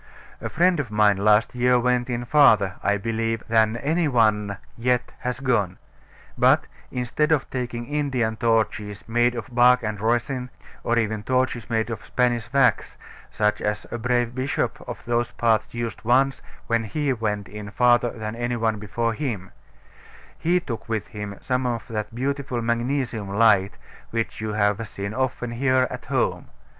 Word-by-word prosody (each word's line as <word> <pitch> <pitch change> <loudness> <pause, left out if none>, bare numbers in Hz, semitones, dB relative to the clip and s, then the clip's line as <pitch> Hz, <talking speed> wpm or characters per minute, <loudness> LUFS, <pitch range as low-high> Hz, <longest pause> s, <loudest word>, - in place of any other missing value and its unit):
A - - -3
friend 175 0 +3
of 135 -5 -2
mine 105 -2 +3
last 105 +2 +3
year 125 0 +3
went 125 0 +1
in 120 0 -2
farther, 115 -9 +5
I 100 0 +2
believe, 115 +2 -2
than 110 0 +3
any 160 +6 +1
one 105 -5 +2 0.2
yet 125 +1 0
has 125 -1 -3
gone; 110 -9 0 0.6
but, - - +4 0.2
instead 125 +5 -1
of 150 -4 +2
taking 120 -2 -3
Indian 130 -5 -1
torches 110 -3 -1
made 120 +2 +2
of 120 +1 -7
bark 125 0 +5
and 105 -2 -3
resin, 120 +3 0 0.3
or 120 - +1
even 110 -2 0
torches 130 0 -1
made 115 0 0
of 110 - -5
Spanish 120 -2 0
wax, 135 -2 +2 0.3
such 105 0 0
as 105 0 -2
a 120 - -3
brave 120 0 0
bishop 130 +2 -2
of - - -7
those 120 0 0
parts 110 -2 +1
used 120 -3 -4
once 130 +3 +2 0.2
when 115 -1 0
he 140 +5 -1
went 105 -4 -2
in 105 -1 -8
farther 120 +2 +3
than 110 -1 -6
any 120 +1 -2
one 110 -2 0
before 115 +3 -1
him, 110 -9 -4 0.8
he 175 +2 +1
took 120 -10 -7
with 110 -2 -2
him 105 -1 -6
some 125 0 0
of 120 -2 -3
that 105 0 -4
beautiful 135 -1 -2
magnesium 120 -2 -1
light 100 -2 +4 0.4
which 115 -1 -3
you 110 -1 -3
have 105 +1 +1
seen 100 +1 -5
often 125 -1 -2
here 130 +1 +2
at - - -7
home. - - -1
120 Hz, 165 wpm, -24 LUFS, 110-125 Hz, 0.8 s, farther